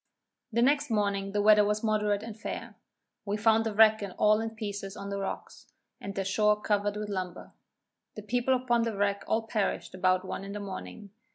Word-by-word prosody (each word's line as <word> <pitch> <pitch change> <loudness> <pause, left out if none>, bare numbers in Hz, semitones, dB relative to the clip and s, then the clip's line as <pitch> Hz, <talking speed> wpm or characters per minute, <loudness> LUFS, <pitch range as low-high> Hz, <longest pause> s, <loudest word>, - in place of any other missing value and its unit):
The 235 +2 +2
next 285 +2 +2
morning 200 -2 0
the 205 0 0
weather 210 0 +7
was 210 +1 0
moderate 210 -1 +1
and 225 -2 -7
fair. 215 - -6 0.5
We 205 +1 -2
found 225 +1 +3
the 215 - -4
wreck 220 0 +6 0.2
all 215 +1 +4
in 225 - -2
pieces 205 -3 -5
on 200 0 -6
the 200 - -2
rocks, 195 - -6 0.3
and 200 0 -7
the 195 - -2
shore 210 +2 +2
covered 205 -1 0
with 210 0 -4
lumber. 185 -3 -5 0.6
The 215 - -7
people 245 +4 +1
upon 245 -2 +1
the 230 -3 -2
wreck 200 0 0
all 225 +1 +1
perished 215 -3 -2
about 185 0 +1
one 190 - -5
in 200 +1 -6
morning. 200 +1 -8
210 Hz, 190 wpm, -29 LUFS, 200-220 Hz, 0.6 s, weather